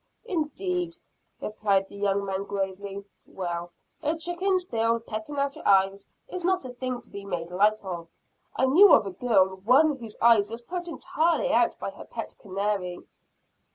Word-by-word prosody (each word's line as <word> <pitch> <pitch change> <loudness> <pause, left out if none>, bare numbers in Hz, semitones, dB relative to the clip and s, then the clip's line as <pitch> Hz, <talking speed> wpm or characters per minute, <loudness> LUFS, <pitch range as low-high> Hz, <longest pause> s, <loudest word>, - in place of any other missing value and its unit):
"Indeed!" 355 -1 -2 0.4
replied 200 -2 0
the - - -13
young 200 0 0
man 195 0 -2
gravely; 200 0 -4 0.2
"well, 175 -2 -4 0.3
a 310 +1 0
chicken's 360 +2 0
bill, 230 -5 +1
pecking 225 +5 -6
at 280 0 0
your - - -6
eyes, 195 0 +3 0.2
is 365 -7 -6
not 365 -4 +1
a - - -5
thing 250 0 -4
to - - -14
be 200 - -7
made 175 -3 -4
light 210 +4 +3
of. 170 -3 -5 0.5
I - - +3
knew 350 +10 +8
of - - +2
a 195 - -4
girl, 190 -4 +2
one 255 +11 +5
of 275 - -6
whose 225 -3 -9
eyes 225 -3 +5
was 230 +1 -7
put 350 +6 -5
entirely 345 +6 0
out - - +3
by - - -4
her - - -11
pet - - -6
canary." 195 -2 -2
220 Hz, 175 wpm, -27 LUFS, 195-315 Hz, 0.5 s, knew